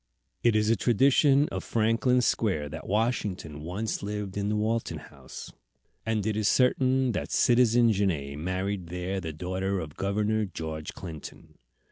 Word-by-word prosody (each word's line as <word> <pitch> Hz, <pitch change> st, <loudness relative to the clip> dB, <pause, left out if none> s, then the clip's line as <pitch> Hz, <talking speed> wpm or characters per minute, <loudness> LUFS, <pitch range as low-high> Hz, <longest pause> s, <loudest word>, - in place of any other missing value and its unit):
It 120 Hz, -2 st, +3 dB
is 110 Hz, +1 st, +3 dB
a -, -, +4 dB
tradition 135 Hz, +5 st, +4 dB
of -, -, -4 dB
Franklin 115 Hz, +3 st, +2 dB
Square 95 Hz, -11 st, 0 dB
that 80 Hz, +2 st, -8 dB
Washington 100 Hz, -8 st, -1 dB
once 95 Hz, +7 st, -3 dB
lived 100 Hz, -1 st, -4 dB
in 100 Hz, 0 st, -1 dB
the 105 Hz, -, 0 dB
Walton 110 Hz, +2 st, -1 dB
House; -, -, -11 dB, 0.5 s
and 110 Hz, -2 st, 0 dB
it 110 Hz, -1 st, 0 dB
is 105 Hz, -1 st, +1 dB
certain 130 Hz, 0 st, +3 dB
that -, -, -3 dB
Citizen 120 Hz, -1 st, +4 dB
Genet 80 Hz, -9 st, -1 dB
married 95 Hz, +2 st, -2 dB
there 90 Hz, +3 st, -3 dB
the 80 Hz, -2 st, -4 dB
daughter 95 Hz, +4 st, -2 dB
of 75 Hz, -3 st, -7 dB
Governor 105 Hz, +2 st, 0 dB
George 80 Hz, -4 st, -6 dB
Clinton. 80 Hz, -5 st, -10 dB
105 Hz, 150 wpm, -28 LUFS, 90-115 Hz, 0.5 s, a